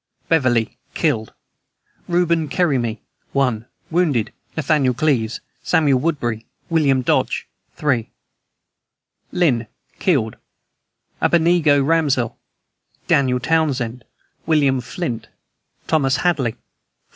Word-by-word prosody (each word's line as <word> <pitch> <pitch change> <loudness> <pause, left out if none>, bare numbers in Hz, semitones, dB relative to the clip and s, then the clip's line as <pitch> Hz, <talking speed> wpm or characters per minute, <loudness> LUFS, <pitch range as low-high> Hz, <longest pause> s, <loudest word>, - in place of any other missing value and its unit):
BEVERLY. 130 -8 +2 0.2
Killed: 110 0 0 0.8
Reuben 170 -3 +1
Kerryme, 130 -10 +1 0.4
1. 125 -4 0 0.2
Wounded: 150 -11 +1 0.2
Nathaniel 145 -4 +2
Cleves, 125 -6 0 0.2
Samuel 150 -6 +3
Woodbury, 120 -7 -2 0.2
William 140 -5 +3
Dodge, - - 0 0.3
3. 125 -7 0 1.2
LYNN. 125 -10 +1 0.3
Killed: 130 - +1 0.8
Abednego 160 -4 +4
Ramsdell, 140 -6 +1 0.7
Daniel 130 -2 +2
Townsend, 130 -5 0 0.4
William 140 -5 +3
Flint, 120 -3 -4 0.6
Thomas 135 -4 +2
Hadley, 140 -10 +1
4. - - -32
140 Hz, 85 wpm, -20 LUFS, 120-160 Hz, 1.2 s, Abednego